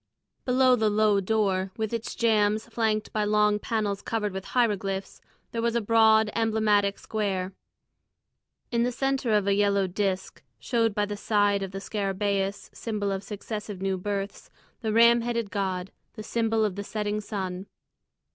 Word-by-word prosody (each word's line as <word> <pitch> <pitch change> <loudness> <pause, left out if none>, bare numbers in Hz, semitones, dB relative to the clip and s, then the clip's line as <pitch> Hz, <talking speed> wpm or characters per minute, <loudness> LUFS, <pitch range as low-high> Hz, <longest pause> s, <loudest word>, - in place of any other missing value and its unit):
Below 255 0 +4
the 220 -3 +2
low 210 -1 +3
door, 195 -2 0
with 220 0 -2
its 230 -1 -4
jambs 215 -2 +2
flanked 220 -2 -1
by 215 - +1
long 210 0 +3
panels 210 -3 -2
covered 210 -3 -2
with 190 0 -5
hieroglyphs, 200 -5 -1 0.3
there 230 - -2
was 235 0 0
a - - +3
broad, 220 -1 +4
emblematic 215 -3 +2
square. 195 -3 -2 1.2
In 235 -1 +1
the 245 +1 +1
centre 270 -1 -1
of 210 -2 +3
a 200 - +3
yellow 200 -1 +2
disc 190 0 -2 0.2
showed 230 -4 0
by 210 - +1
the 205 0 -5
side 205 -1 +2
of 195 - -3
the 195 - -7
scarabæus, 200 0 -2
symbol 210 -3 -2
of 195 -1 -2
successive 210 -1 -6
new 195 0 0
births, 200 +1 -4 0.3
the 220 -2 -1
ram 235 +2 +6
headed 235 -3 -2
god, 190 -1 -2 0.2
the 215 - -8
symbol 225 0 +1
of 200 -2 -3
the 200 - -3
setting 210 0 -2
sun. 190 -2 -5
210 Hz, 160 wpm, -27 LUFS, 200-225 Hz, 1.2 s, ram